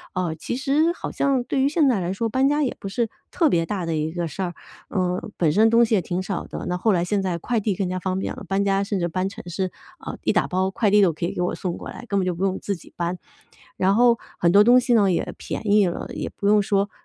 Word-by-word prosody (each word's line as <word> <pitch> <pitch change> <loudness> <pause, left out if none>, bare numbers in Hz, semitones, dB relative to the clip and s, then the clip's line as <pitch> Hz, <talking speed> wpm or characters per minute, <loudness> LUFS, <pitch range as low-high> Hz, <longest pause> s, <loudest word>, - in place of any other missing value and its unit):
哦 180 -3 -1
其 - - -3
实 295 +5 +2
好 - - -6
像 270 -3 +1
对 265 +2 -1
于 270 - +4
现 300 -1 +3
在 235 -6 +2
来 175 0 -2
说， 225 +4 -1
搬 260 +4 +2
家 295 +1 +1
也 260 - -1
不 195 - -6
是 230 +4 0 0.2
特 330 - +2
别 170 -9 +2
大 190 -2 -3
的 165 -1 -1
一 155 +1 -1
个 175 0 -3
事 165 - -6
儿。 175 -1 -3 0.4
嗯 185 +2 -2
本 160 -4 +2
身 220 +7 +4
东 230 +1 +5
西 225 - -2
也 195 - +2
挺 175 +2 -3
少 195 -1 -3
的， - - -6
那 180 - -1
后 215 +5 +2
来 175 -2 +1
现 200 +2 0
在 185 -3 -1
快 235 +7 -1
递 210 -2 -1
更 190 0 -1
加 185 0 -2
方 185 +1 -2
便 - - -3
了， - - -9
搬 195 +3 +1
家 195 0 +2
甚 200 -1 -2
至 175 - 0
搬 185 +2 -1
城 225 +3 -10
市， 185 +1 -2 0.3
呃， - - -5
一 - - +2
打 - - +2
包 185 +1 0
快 210 +1 +1
递 210 - +6
都 180 -4 +4
可 160 - -3
以 - - -4
给 - - -2
我 180 - -1
送 180 -2 -4
过 - - -8
来， - - -9
根 200 -2 0
本 185 - 0
就 180 - 0
不 180 - -3
用 190 -1 -1
自 200 - -3
己 170 - -15
搬。 175 +1 -2 0.6
然 190 +1 +3
后 235 +1 +4 0.2
很 170 0 +3
多 205 +2 +7
东 245 +3 +7
西 250 0 0
呢 205 -4 +4
也 - - -2
便 - - -5
宜 205 -2 +5
了， 175 - -4
也 - - -4
不 200 - -3
用 210 0 +5
说 200 0 0
195 Hz, 315 characters per minute, -23 LUFS, 180-225 Hz, 0.6 s, 多